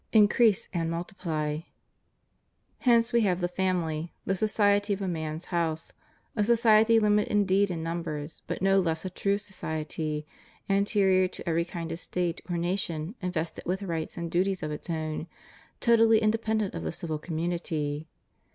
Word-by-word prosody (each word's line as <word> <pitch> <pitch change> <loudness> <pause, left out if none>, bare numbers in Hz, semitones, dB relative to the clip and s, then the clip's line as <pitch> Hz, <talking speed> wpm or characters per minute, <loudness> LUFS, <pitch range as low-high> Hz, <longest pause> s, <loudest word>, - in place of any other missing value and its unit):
Increase 215 -1 +5
and 165 -2 0
multiply} 165 -4 -3 1.2
Hence 235 -2 +3
we 235 - +5
have 185 -4 +2
the 175 - +1
family; 175 -3 -1
the - - +1
''society" 205 0 +2
of 200 - -9
a - - -1
man's 160 -1 -3
house 165 -2 -1 0.2
— - - -39
a 210 - +2
society 225 0 +5
Umited 210 -1 +3
indeed 200 -1 +3
in 165 -3 -3
numbers, 160 -2 -4
but - - -3
no 195 0 +5
less 165 -1 0
a 185 - -3
true 200 +2 0
"society," 155 -6 -4 0.4
anterior 195 -2 +3
to 180 - -10
every 170 0 +1
kind 170 -2 -5
of 165 - -4
State 175 -2 -2
or 175 - -1
nation, 170 -1 -2
invested 170 -3 -3
with 190 +3 -1
rights 165 -4 -3
and 170 -1 -4
duties 185 +1 +1
of 155 - -2
its 150 - -6
ot\ti, 160 0 -3 0.5
totally 225 -1 +5
inde 220 +1 +1
pendent 220 -2 0
of - - -4
the 80 -1 -3
civil 155 - -4
community. 160 -2 -2
180 Hz, 160 wpm, -28 LUFS, 160-205 Hz, 1.2 s, Increase